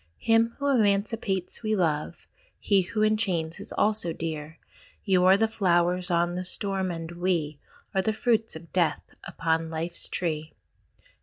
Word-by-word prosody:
Him 230 0 +2
who 280 - -4
emancipates 200 -5 +1
we 215 -1 0
love, 165 -3 -1 0.3
He 200 -2 +3
who 215 +4 -1
enchains 195 -6 0
is 200 - -4
also 210 -6 0
dear: 160 -1 -5 0.5
You 185 -3 +3
are 190 +1 +7
the 225 +2 +3
Flowers 180 -3 +1
of 175 0 +2
the 180 +1 -3
Storm, 190 0 -3
and 165 -1 -5
we, 170 - -11
We 160 -5 0 0.3
are 190 - +2
the 220 - +1
Fruits 225 -1 0
of 165 +1 -11
Death 175 -3 0
upon 165 0 -1
Life's 165 +2 -5
tree. 155 -3 -3
180 Hz, 155 wpm, -27 LUFS, 165-215 Hz, 0.5 s, are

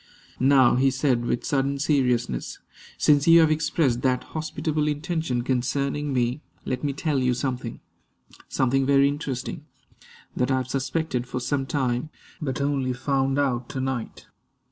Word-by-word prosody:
"Now," 130 -2 +5
he 135 +1 +4
said 130 -2 0
with 120 - -1
sudden 140 0 0
seriousness, 125 - 0 0.4
"since 145 0 +3
you 165 0 +8
have 160 -1 +4
expressed 150 -5 +1
that 130 -1 +1
hospitable 155 -1 -2
intention 150 -4 -1
concerning 140 +3 -1
me, 125 +2 0 0.2
let 125 - -3
me 145 - 0
tell 145 0 -1
you 125 -1 +1
something 125 -3 -4 0.7
something 135 +1 +1
very 140 +1 +4
interesting, 145 +1 -4 0.7
that 125 - 0
I 130 - +2
have 130 -1 -3
suspected 135 -1 -2
for 125 - -3
some 135 +2 -1
time, 130 0 -1 0.3
but 140 -1 -2
only 140 -2 0
found 135 +1 0
out 125 -4 0
to 130 - -4
night. 130 -3 -4
135 Hz, 145 wpm, -25 LUFS, 125-145 Hz, 0.7 s, you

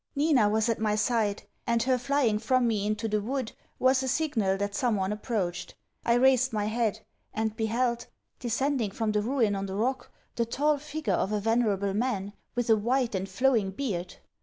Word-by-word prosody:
Nina 280 -7 +3
was 220 +1 +1
at 230 -2 0
my 215 -1 +1
side 215 -1 0 0.2
and 235 -1 +2
her 255 0 +2
flying 250 -4 +1
from 245 +2 +2
me 210 -3 0
into 215 +1 -1
the 210 -1 0
wood, 255 +2 -3 0.3
was 260 +1 +3
a 265 - -2
signal 240 -10 +1
that 200 0 -2
some 235 +1 +1
one 190 0 -1
approached. 205 -5 -3 0.3
I 235 - +3
raised 255 0 +4
my 210 -2 -1
head; 220 0 -1 0.3
and 220 0 -1
beheld, 235 +2 -1 0.3
descending 250 -1 0
from 215 +2 -2
the 210 0 +1
Ruin 230 -2 +1
on 195 0 -3
the 190 - -5
Rock, 255 +6 -1 0.2
the 235 - 0
tall 290 +4 +1
figure 305 +1 -3
of 195 - 0
a 210 - 0
venerable 205 -3 +1
man, 205 -3 -1 0.2
with 245 -1 -1
a - - +7
white 240 +3 0
and 190 0 -2
flowing 230 -1 +2
beard. 190 -5 -4
225 Hz, 190 wpm, -28 LUFS, 210-255 Hz, 0.3 s, a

